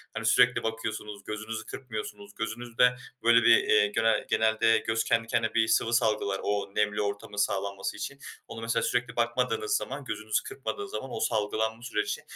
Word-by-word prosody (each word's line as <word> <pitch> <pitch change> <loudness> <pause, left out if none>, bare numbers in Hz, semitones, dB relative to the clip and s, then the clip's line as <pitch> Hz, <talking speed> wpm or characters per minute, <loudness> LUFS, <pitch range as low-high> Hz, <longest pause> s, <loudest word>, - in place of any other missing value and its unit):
Yani - - -3
sürekli - - +4
bakıyorsunuz, 110 -2 -4
gözünüzü 110 +1 -5
kırpmıyorsunuz, 105 -5 -7
gözünüzde 120 +2 +1 0.3
böyle 115 0 +6
bir, 115 -1 +7
iii, 105 -1 +3
gene 115 +1 +2
genelde 110 0 +3
göz 115 0 +1
kendi 115 0 +1
kendine 115 -1 0
bir 115 -1 +3
sıvı 115 - +2
salgılar 105 -4 +1
o 100 -1 -1
nemli 105 0 +1
ortamın 100 0 -4
sağlanması 100 -1 -1
için. 140 - -6 0.3
Onu 115 - -8
mesela 115 0 0
sürekli 125 0 -1
bakmadığınız 125 - +1
zaman - - -6
gözünüzü - - -2
kırpmadığı 405 -1 -5
zaman 135 - -5
o - - -4
salgılanma 110 +1 -1
süreci 105 -4 -2
110 Hz, 160 wpm, -28 LUFS, 105-115 Hz, 0.3 s, bir